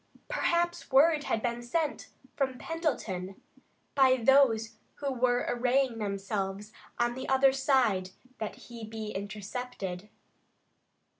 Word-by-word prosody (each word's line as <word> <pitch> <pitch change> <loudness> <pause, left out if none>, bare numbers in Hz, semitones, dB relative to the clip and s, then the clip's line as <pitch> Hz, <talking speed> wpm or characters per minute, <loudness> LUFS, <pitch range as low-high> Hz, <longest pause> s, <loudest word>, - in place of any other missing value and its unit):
Perhaps 345 -7 0
word 295 +2 +5
had 220 - -1
been 240 -1 -1
sent 300 +5 -2 0.3
from 265 -2 -1
Pendleton 220 - -3 0.5
by 260 -2 +5
those 230 -4 +3 0.2
who 280 -2 -2
were 245 0 +1
arraying 245 0 +1
themselves 200 0 -3 0.2
on 240 0 +1
the 260 +1 -6
other 265 0 +5
side 260 -9 +2 0.3
that 215 -2 -4
he 235 -2 -11
be 220 -1 -5
intercepted. 205 -1 -5
240 Hz, 115 wpm, -30 LUFS, 210-270 Hz, 0.5 s, word